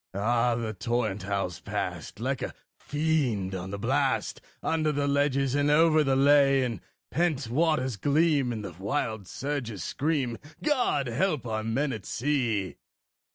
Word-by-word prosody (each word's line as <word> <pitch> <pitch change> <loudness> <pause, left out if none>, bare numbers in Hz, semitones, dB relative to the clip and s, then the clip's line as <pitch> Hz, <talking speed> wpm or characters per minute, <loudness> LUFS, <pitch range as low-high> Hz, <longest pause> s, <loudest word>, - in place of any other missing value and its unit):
Ah! 115 +4 +2
the 115 -2 -3
torrent 110 -1 -1
howls 95 -4 -2
past, - - -4
like - - -2
a - - -4 0.2
fiend 140 -11 0
on 95 0 -4
the 100 - -4
blast, 100 - 0 0.2
Under 155 -1 +1
the 145 -1 0
ledges 140 -2 +1
and 145 +1 +2
over 155 +1 +5
the 135 -2 +2
lea; 140 -1 +5
And 115 -6 -2
the - - -30 0.3
pent 150 -5 0
waters 130 -2 +1
gleam, 145 - +2
and 110 -3 -4
the 90 - -6
wild 105 -1 -2
surges 130 -5 -4
scream 135 -6 -1 0.2
God 255 - +2
help 150 +3 0
our 110 -1 -2
men 130 +5 0
at 105 -4 -7
sea! 120 -8 -1
130 Hz, 155 wpm, -28 LUFS, 110-145 Hz, 0.3 s, over